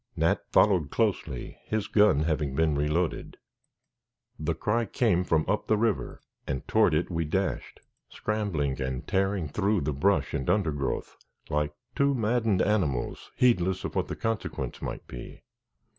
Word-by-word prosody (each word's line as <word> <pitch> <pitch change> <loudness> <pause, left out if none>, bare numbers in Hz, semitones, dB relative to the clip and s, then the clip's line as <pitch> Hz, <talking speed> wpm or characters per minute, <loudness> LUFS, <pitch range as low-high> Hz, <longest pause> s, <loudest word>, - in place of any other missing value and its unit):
Nat - - +2
followed 90 -8 +4
closely, 90 - -1
his 110 -2 -1
gun 105 -9 +4
having 75 -3 -1
been 80 0 +2
reloaded. 75 +4 -1 1.0
The 80 +1 -1
cry 115 +2 0
came 105 -5 +2
from 80 -3 +1
up 105 - 0
the 110 - +3
river 110 -2 -1 0.3
and 65 -2 -3
toward - - +4
it 85 +4 0
we 85 -1 0
dashed, 75 - -2 0.3
scrambling 85 -11 -2
and 65 -1 -3
tearing 95 -3 0
through 100 +6 +1
the 75 +1 -1
brush 95 +9 +1
and 65 - -2
undergrowth, 75 -9 -1 0.3
like 75 0 0 0.2
two 140 0 +3
maddened 115 -4 +2
animals, 85 - -1
heedless 95 -7 +2
of - - -4
what - - 0
the - - -4
consequence 115 -1 -3
might - - -5
be. - - -9
90 Hz, 145 wpm, -28 LUFS, 75-105 Hz, 1.0 s, followed